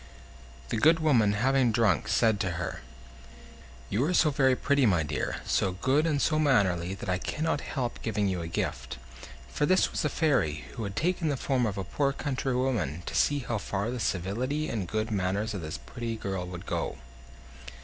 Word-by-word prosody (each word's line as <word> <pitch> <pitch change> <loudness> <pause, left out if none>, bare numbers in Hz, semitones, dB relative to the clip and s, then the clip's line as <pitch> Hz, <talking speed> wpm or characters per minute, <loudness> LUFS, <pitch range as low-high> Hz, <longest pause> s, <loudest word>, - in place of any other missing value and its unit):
The - - -1
good 160 +8 +5
woman, 120 -10 +3
having 125 +3 +2
drunk, 110 -1 +2
said 110 0 +3
to 95 -3 -1
her: 90 +2 -4 1.1
"You 110 +6 +1
are 180 +3 +1
so 155 - +4
very 135 -2 +3
pretty, 140 -1 +2
my 90 -6 +3
dear, 75 - -2
so 95 - +1
good 135 - +1
and 150 -3 +1
so 155 +2 +2
mannerly, 95 - +2
that 100 - -8
I 90 -1 0
cannot 155 - -1
help 125 -3 -4
giving 105 -3 0
you 90 -2 -1
a 80 - -4
gift." 80 - -3 0.5
For 145 - 0
this 185 0 +3
was - - -2
a - - +1
fairy, 80 - +1
who 115 - -4
had 100 0 -5
taken 175 0 0
the 140 - 0
form 125 -3 +1
of 100 -1 -4
a 95 - -2
poor 140 +8 0
country 135 -2 -2
woman, 115 - -1
to - - -5
see 145 -1 +2
how 115 -3 -1
far 100 +3 -2
the 125 - -4
civility 120 - -1
and 100 -6 -3
good 110 +3 -2
manners 100 +2 -1
of 100 - -4
this 80 -1 -5
pretty 120 -2 -5
girl 95 -4 -4
would 90 0 -8
go. - - -2
115 Hz, 195 wpm, -28 LUFS, 95-140 Hz, 1.1 s, good